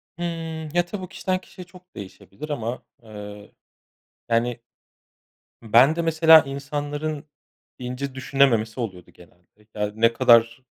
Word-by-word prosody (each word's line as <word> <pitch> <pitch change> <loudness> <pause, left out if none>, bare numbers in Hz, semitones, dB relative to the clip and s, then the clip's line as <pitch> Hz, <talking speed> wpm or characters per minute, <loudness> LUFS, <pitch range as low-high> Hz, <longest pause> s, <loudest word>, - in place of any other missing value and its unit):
Hımm. 165 -2 -5
Ya, 175 0 +3
tabii 185 0 -7
kişiden 185 0 -2
kişiye 180 -1 -12
çok 180 +1 -19
değişebilir 100 - -10
ama, 120 -3 -4 0.2
eee, 105 -1 -11 0.8
yani, 115 +1 0 1.0
ben 125 +8 +5
de, 170 - -1
mesela, 160 0 +7
insanların 145 +2 -4 0.5
ince 130 +2 -5
düşünememesi 130 -4 +1
oluyordu 95 -6 -6
genelde. 90 +4 -22
Ya, 105 -1 -2
ne 115 +1 +3
kadar 115 +1 +4
130 Hz, 115 wpm, -23 LUFS, 110-160 Hz, 1.0 s, mesela